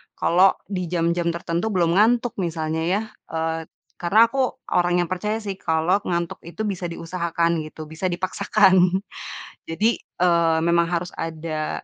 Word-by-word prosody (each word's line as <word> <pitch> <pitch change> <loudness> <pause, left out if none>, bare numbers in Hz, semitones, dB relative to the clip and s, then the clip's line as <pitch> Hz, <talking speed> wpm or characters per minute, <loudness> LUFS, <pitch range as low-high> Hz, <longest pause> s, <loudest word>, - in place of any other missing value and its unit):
kalau 185 +3 +4 0.2
di 180 -2 -2
jam-jam 170 0 0
tertentu 170 +4 -2
belum 180 -3 +2
ngantuk, 235 +2 +3
misalnya 160 -2 -2
ya, 195 +4 +1 0.3
eee, 160 0 -3 0.3
karena 215 +7 +4
aku 265 0 0 0.2
orang 175 0 +3
yang 175 - -3
percaya 210 +4 -2
sih, 200 -3 -5
kalau 160 +2 +1
ngantuk 170 -1 -2
itu 170 +5 -7
bisa 195 -4 -2
diusahakan 170 -1 -1
gitu, 155 0 -9
bisa 160 +4 -5
dipaksakan. 185 0 +3 0.7
Jadi, 210 +8 +1
eee, 170 -2 +1
memang 170 0 +3
harus 175 +1 -2
ada, 160 -1 -4
175 Hz, 140 wpm, -23 LUFS, 165-190 Hz, 0.7 s, kalau